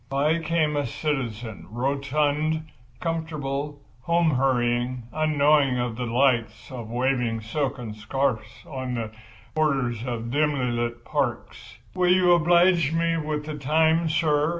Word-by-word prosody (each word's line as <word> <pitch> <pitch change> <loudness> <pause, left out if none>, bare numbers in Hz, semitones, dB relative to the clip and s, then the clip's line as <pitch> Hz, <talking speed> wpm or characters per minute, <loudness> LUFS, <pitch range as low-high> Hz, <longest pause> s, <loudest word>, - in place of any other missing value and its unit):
By 150 +4 +1
came 160 -2 0
a 145 -3 0
citizen, 120 -6 -4
rotund, 145 +5 0 0.4
comfortable, 150 -3 -3 0.2
home 170 +3 +2
hurrying, 125 -2 +1
unknowing 150 -3 +3
of 120 -2 -2
the 125 +1 -3
delights 120 -2 +1
of 120 -4 -7
waving 120 -2 0
silken 125 0 -3
scarfs 110 0 -2
on 130 -3 -4
the 115 -2 -4 0.4
borders 135 -7 0
of 120 -2 -4
dimly 145 -3 +1
lit 120 0 -3
parks. - - -3 0.2
"Will 180 -1 +2
you 180 -1 +5
oblige 175 -1 +4
me 165 0 +1
with 150 -1 -3
the 150 -1 -5
time, 160 +3 +2
sir?" 150 -1 +2
140 Hz, 125 wpm, -25 LUFS, 120-155 Hz, 0.4 s, you